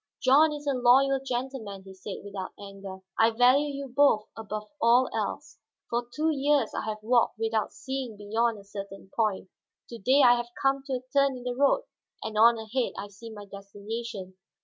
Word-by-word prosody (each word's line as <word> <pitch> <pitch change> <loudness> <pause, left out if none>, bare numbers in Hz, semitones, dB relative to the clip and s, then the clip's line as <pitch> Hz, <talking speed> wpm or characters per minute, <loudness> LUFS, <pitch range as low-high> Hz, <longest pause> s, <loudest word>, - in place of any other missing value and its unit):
"John 285 +4 +5
is 295 0 -6
a 280 - +1
loyal 265 +2 +4
gentleman," 245 -6 -4
he 190 0 -12
said, 190 +1 -8
without 200 -2 -6
anger; 195 -1 -9 0.2
"I 225 - +6
value 250 +5 +4
you 280 0 -5
both 260 -5 +3
above 215 -1 -6
all 240 +3 +5
else. - - -4 0.3
For 240 0 -1
two 310 +4 0
years 285 -4 +1
I - - -3
have 215 -1 -5
walked 240 0 +2
without 220 -1 -1
seeing 265 -5 -5
beyond 220 +2 0
a 200 - -12
certain 195 -1 -9
point, 210 -4 0 0.4
to 235 - -8
day 265 +7 +4
I 245 0 +7
have 240 0 -4
come 270 +2 +2
to 270 - -3
a 250 - -2
turn 275 -2 +3
in 245 - -10
the 250 0 -2
road 285 - +2 0.4
and 220 0 -5
on 230 +2 +6
ahead 225 +3 -2
I 205 - -6
see 205 +3 -11
my 205 -2 -9
destination. 200 0 -7
235 Hz, 190 wpm, -27 LUFS, 205-265 Hz, 0.4 s, I